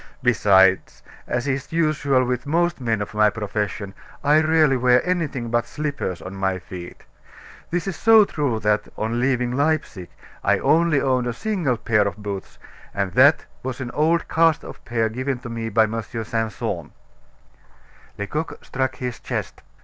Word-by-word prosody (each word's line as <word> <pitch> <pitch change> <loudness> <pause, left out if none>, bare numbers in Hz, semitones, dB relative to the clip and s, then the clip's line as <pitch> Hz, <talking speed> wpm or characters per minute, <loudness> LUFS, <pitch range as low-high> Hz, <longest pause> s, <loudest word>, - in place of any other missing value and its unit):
Besides, 95 -5 +3 0.2
as 125 +3 -2
is 135 0 -2
usual 155 -5 +2
with 125 +2 -2
most 170 0 +1
men 115 -4 0
of 105 - -10
my 105 0 +4
profession, 105 -1 -4 0.3
I 150 +2 +5
rarely 155 -3 +3
wear 125 0 +3
anything 150 -10 -1
but 120 0 +1
slippers 140 - -4
on 90 - -7
my 95 -1 -1
feet. 90 -1 -10 0.7
This 175 0 -2
is 195 -3 -3
so 225 -2 +6
true 140 - -1
that, 105 0 +1
on 115 +2 -1
leaving 125 -2 +1
Leipsic, 140 - -1 0.3
I - - +3
only 165 -2 +3
owned 130 -3 +1
a 120 - -1
single 165 - -1
pair 105 -2 +2
of 100 - -5
boots, 100 -2 -6 0.4
and 100 -2 -1
that 140 - +5 0.2
was 130 0 -5
an 125 -2 -5
old 165 +3 +1
cast 165 -1 +2
off - - -11
pair 115 -2 0
given 130 +3 -3
me 115 -1 -3
by 110 +1 +4
M. 115 +1 -2
Simpson." 115 -1 -4 1.2
Lecoq 150 +11 -4
struck 130 -1 -2
his 125 -2 -5
chest. - - -5
125 Hz, 155 wpm, -22 LUFS, 110-150 Hz, 1.2 s, so